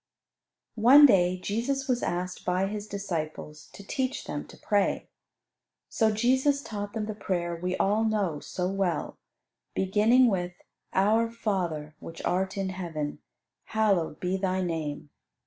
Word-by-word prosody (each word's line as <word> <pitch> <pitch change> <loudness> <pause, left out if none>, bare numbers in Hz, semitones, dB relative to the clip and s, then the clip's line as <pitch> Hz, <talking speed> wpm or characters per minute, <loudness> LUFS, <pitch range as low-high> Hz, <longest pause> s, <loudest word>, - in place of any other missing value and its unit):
One 275 +6 +9
day 185 -7 +4
Jesus 255 +8 -2
was 250 -2 +1
asked 180 +1 -3
by 180 +1 +1
His 205 +1 -4
disciples 160 -6 -5
to 200 - -11
teach 260 +4 -2
them 145 - -5
to - - -14
pray. 205 -1 0 0.8
So 220 -2 +2
Jesus 260 +6 +2
taught 205 -1 -5
them 220 -2 -2
the 215 - -4
prayer 175 -4 -2
we 180 +2 -2
all 210 +3 +2
know 205 -8 0
so 180 +4 -3
well, 190 -4 -2 0.6
beginning 215 +7 +4
with 180 -6 0 0.4
"Our 220 +4 +3
Father, 175 -9 -2
which 165 - -9
art 190 +2 0
in 195 -1 -1
Heaven, 165 -6 -4 0.5
hallowed 195 -8 +1
be 185 +1 -1
Thy 185 -1 0
name." 155 -4 -4
195 Hz, 140 wpm, -28 LUFS, 175-220 Hz, 0.8 s, One